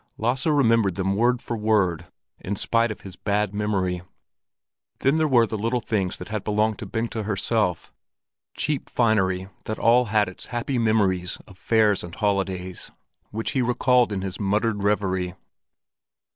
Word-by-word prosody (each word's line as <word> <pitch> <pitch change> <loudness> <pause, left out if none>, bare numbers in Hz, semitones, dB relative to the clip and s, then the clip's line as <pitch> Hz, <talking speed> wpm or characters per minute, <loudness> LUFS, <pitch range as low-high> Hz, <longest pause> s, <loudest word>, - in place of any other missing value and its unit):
Lasse 125 +6 0
remembered 115 - +3
them 95 +1 0
word 120 +3 +2
for 120 - -3
word, 100 -6 +1 0.3
in 100 - -3
spite 115 +3 +1
of 110 - -6
his 95 -2 -10
bad 105 0 -1
memory. 95 -4 -1 1.0
Then 135 +4 +3
there 160 -1 +2
were 120 -5 +5
little 115 +3 -1
things 100 -5 -1
that 90 - -9
had 105 -2 -3
belonged 105 0 +1
to - - -6
Bengta 115 -1 -2
herself, 105 -2 -1 0.6
cheap 150 -3 -1
finery 95 -6 +1 0.2
that 110 - -3
all 120 +2 +4
had 105 -2 +2
its 95 - -8
happy 120 +2 -2
memory 105 -5 +2 0.2
of 95 - -15
fairs 105 0 +2
and 85 0 -8
holidays, 95 -3 -1 0.4
which 110 +2 -3
he 130 - +1
recalled 125 -1 +3
in 95 -2 -2
his 95 -1 -4
muttered 105 +1 0
reverie. 95 -3 0
105 Hz, 155 wpm, -24 LUFS, 95-115 Hz, 1.0 s, were